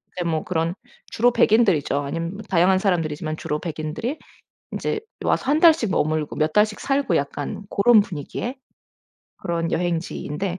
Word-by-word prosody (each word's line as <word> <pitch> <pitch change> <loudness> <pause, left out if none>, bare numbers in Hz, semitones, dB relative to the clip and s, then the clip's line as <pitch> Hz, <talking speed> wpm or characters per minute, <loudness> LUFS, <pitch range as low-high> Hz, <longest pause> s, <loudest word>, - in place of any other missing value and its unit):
이제 180 - -2
뭐 160 -1 -1
그런 165 0 -1 0.3
주로 245 +2 +2
백인들이죠. 200 - +3
아님 165 +6 -4
다양한 185 -1 +3
사람들이지만 155 -5 -1
주로 150 - -2
백인들이 170 - -4 0.5
인제 - - -2 0.3
와서 - - +1
1 300 +2 +3
달씩 320 - +5
머물고 155 -2 0
몇 155 0 +1
달씩 210 0 +2
살고 275 -9 0
약간 145 +6 -3
고런 220 +2 +5
분위기의 200 - -5 0.8
그런 165 -1 -2
여행지인데 175 +1 -2
175 Hz, 330 characters per minute, -23 LUFS, 155-215 Hz, 0.8 s, 달씩